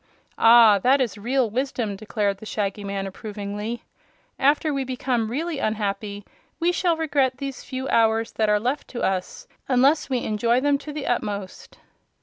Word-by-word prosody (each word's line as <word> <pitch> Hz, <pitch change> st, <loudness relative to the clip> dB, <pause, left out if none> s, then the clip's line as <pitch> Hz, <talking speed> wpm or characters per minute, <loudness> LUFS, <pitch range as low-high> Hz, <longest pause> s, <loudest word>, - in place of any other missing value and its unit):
"Ah! 225 Hz, -3 st, +7 dB
that 260 Hz, +7 st, +4 dB
is 245 Hz, -6 st, 0 dB
real 245 Hz, +4 st, 0 dB
wisdom," 235 Hz, -2 st, -2 dB
declared 205 Hz, -1 st, -2 dB
the 220 Hz, -, -10 dB
Shaggy 205 Hz, -1 st, -2 dB
Man, 200 Hz, -1 st, -3 dB
approvingly. 210 Hz, +3 st, -5 dB, 0.6 s
"After 295 Hz, +2 st, +2 dB
we 275 Hz, -1 st, -1 dB
become 250 Hz, -3 st, -1 dB
really 310 Hz, +4 st, -3 dB
unhappy 205 Hz, -2 st, -2 dB, 0.3 s
we 345 Hz, +1 st, +2 dB
shall 345 Hz, -1 st, +1 dB
regret 280 Hz, -5 st, +1 dB
these 275 Hz, -2 st, -6 dB
few 260 Hz, +1 st, -5 dB
hours 225 Hz, 0 st, +2 dB
that 215 Hz, -1 st, 0 dB
are 210 Hz, 0 st, +3 dB
left 255 Hz, +7 st, -2 dB
to 240 Hz, -, -5 dB
us, 185 Hz, -1 st, -2 dB, 0.2 s
unless 275 Hz, +5 st, +3 dB
we 255 Hz, -2 st, -1 dB
enjoy 230 Hz, +3 st, +1 dB
them 285 Hz, +1 st, +2 dB
to 300 Hz, -, -8 dB
the 295 Hz, -1 st, -5 dB
utmost." 205 Hz, -5 st, -4 dB
235 Hz, 160 wpm, -24 LUFS, 210-270 Hz, 0.6 s, Ah